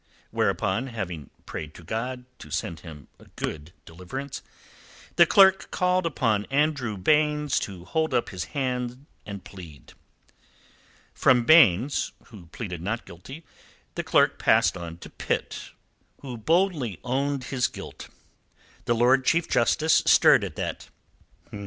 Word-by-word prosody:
Whereupon, 110 +8 0
having 90 - -6 0.2
prayed 80 -1 -7
to 85 - -12
God 125 +7 -4
to 75 - -11
send 85 +1 -3
him 75 -5 -12
a - - -17
good 75 +1 -5
deliverance, 90 +12 -7 0.7
the - - +6
clerk 190 -1 +5
called 180 -1 +1
upon 110 -9 0
Andrew 140 -6 0
Baynes 150 +5 +2
to 90 -3 -7
hold 160 +8 -1
up 120 - 0
his 90 -3 -5
hand 125 -1 -3 0.2
and 100 -2 -7
plead. 85 -9 -13 1.2
From 125 -2 +3
Baynes, 140 - +4 0.2
who 100 -8 -13
pleaded 90 -2 -7
not 115 +6 -3
guilty, 135 - -11 0.5
the - - -3
clerk - - +2
passed - - +3
on 85 -1 -7
to - - -11
Pitt, - - -4 0.5
who 130 -3 -7
boldly 145 - 0
owned 135 +2 -1
his 125 +1 0
guilt. - - -10 0.8
The 120 - +1
Lord 125 +3 +4
Chief 170 +5 +2
Justice 155 +6 +3
stirred - - +6
at - - -5
that. - - -5
120 Hz, 135 wpm, -25 LUFS, 90-145 Hz, 1.2 s, the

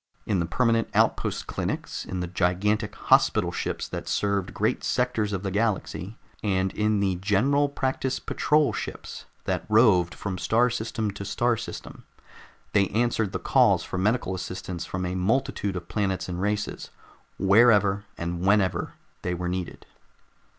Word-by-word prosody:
In 100 -4 0
the 85 - 0
permanent 115 +4 +1
outpost - - +1
clinics, - - -4
in 90 -1 -4
the 90 - -2
gigantic 100 +4 0
hospital - - +3
ships - - -3
that - - -5
served 100 -2 0
great - - -1
sectors 120 -4 0
of 100 -1 -3
the 95 - -2
galaxy, 105 -1 -2 0.2
and 95 -2 0
in 105 -1 +1
the 95 -2 +1
General 125 +10 +2
Practice 130 -1 -1
Patrol 150 -1 +1
ships - - -6 0.2
that - - -1
roved 105 -6 +4
from 95 -2 -4
star 120 +2 +2
system 110 -2 -2
to 100 0 -7
star 120 +4 +1
system, - - -8 0.7
they 100 -2 +4
answered 110 -1 0
the - - -2
calls - - +3
for 90 - -4
medical 105 0 +1
assistance 90 -1 -5
from 90 0 -3
a 90 - -2
multitude 100 0 0
of 85 -1 -6
planets 95 -2 -1
and 90 0 -4
races, 105 +1 -2 0.5
wherever 100 0 +4
and 85 0 -3
whenever 100 -1 +2 0.3
they 90 0 -2
were 90 0 -3
needed. 90 -1 -4
100 Hz, 150 wpm, -26 LUFS, 95-110 Hz, 0.7 s, roved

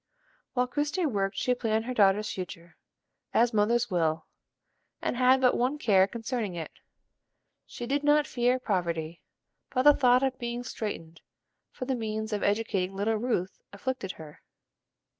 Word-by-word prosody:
While 250 -1 +2
Christie 295 +6 -1
worked 195 -8 -1
she 250 - +1
planned 225 -2 -1
her 255 - -3
daughter's 210 -1 +3
future, 170 -2 -8 0.6
as 235 +1 +4
mothers 225 +2 +2
will, 160 -2 0 0.7
and - - -2
had 255 +1 +5
but 250 -1 +4
one 255 +5 0
care 195 -9 +4
concerning 225 -3 -4
it. 165 -2 -5 1.0
She 240 - -7
did 280 +3 -1
not 295 0 +4
fear 250 0 +1
poverty, 170 -8 -2 0.5
but 255 -1 0
the 295 +1 +8
thought 250 -2 +4
of 265 -1 -1
being 240 0 -4
straitened 165 -9 -6 0.5
for 255 - -6
the 265 - -1
means 220 -2 -3
of 205 - -1
educating 200 -3 0
little 205 +3 0
Ruth 210 -5 -2
afflicted 200 -1 -4
her. 155 -2 -12
225 Hz, 150 wpm, -28 LUFS, 195-255 Hz, 1.0 s, the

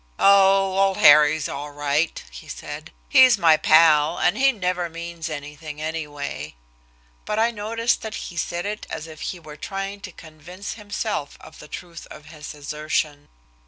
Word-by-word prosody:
"Oh, 195 -1 +4
old 195 -1 +2
Harry's 150 +1 +6
all 145 +1 -6
right," 145 +2 -1
he - - -11
said. - - -8 0.2
"He's 255 - +6
my 165 -4 +5
pal, 155 0 +4
and 175 - +2
he 270 +1 +4
never 180 -5 -2
means 170 0 -6
anything, 150 0 -8
anyway." 145 - -5 0.7
But 210 - -3
I 230 +2 +3
noticed 230 +2 -1
that 220 -1 -6
he 175 - -7
said 175 +1 -3
it 210 +1 -5
as 160 -1 -5
if 160 -1 -12
he 180 - -4
were 150 -2 -12
trying 195 +4 -5
to 195 - -8
convince 170 +5 -9
himself 210 -6 -4
of - - -14
the 150 - -11
truth 170 +1 -9
of 150 - -12
his 155 -1 -10
assertion. 150 0 -3
165 Hz, 160 wpm, -23 LUFS, 150-195 Hz, 0.7 s, Harry's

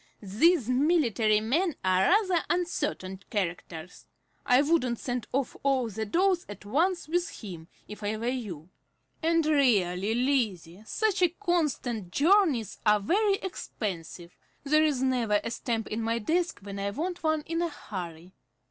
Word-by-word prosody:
"These 250 - +3
military 250 - +2
men 305 - 0
are 185 0 +3
rather 370 -3 +3
uncertain 295 - -2
characters. 175 -3 -4 0.4
I 250 +2 +5
wouldn't 280 -6 +1
send 245 -1 -4
off 270 0 -1
all 265 -4 +1
the 220 +1 -4
dolls 360 - +2
at 205 0 -9
once 340 - 0
with 345 +1 0
him, 170 -5 -8 0.2
if 210 0 -9
I 210 +1 -2
were 225 - -5
you. 200 - -4 0.5
And 330 -1 +2
really, 220 - +2
Lizzie, 220 -9 0
such 430 -3 0 0.2
constant 290 - -1
journeys 300 - +2
are 210 -1 +4
very 395 - +2
expensive. 180 - -6 0.3
There 305 +2 +3
is 285 -4 +1
never 240 -5 +2
a 230 - -3
stamp 230 -1 -2
in 220 +2 -3
my 230 +1 0
desk 330 +8 -1
when 200 0 -7
I 200 0 -1
want 345 - -4
one 315 -1 +1
in 330 +1 -2
a 345 - 0
hurry." 180 - -8
245 Hz, 150 wpm, -28 LUFS, 205-330 Hz, 0.5 s, I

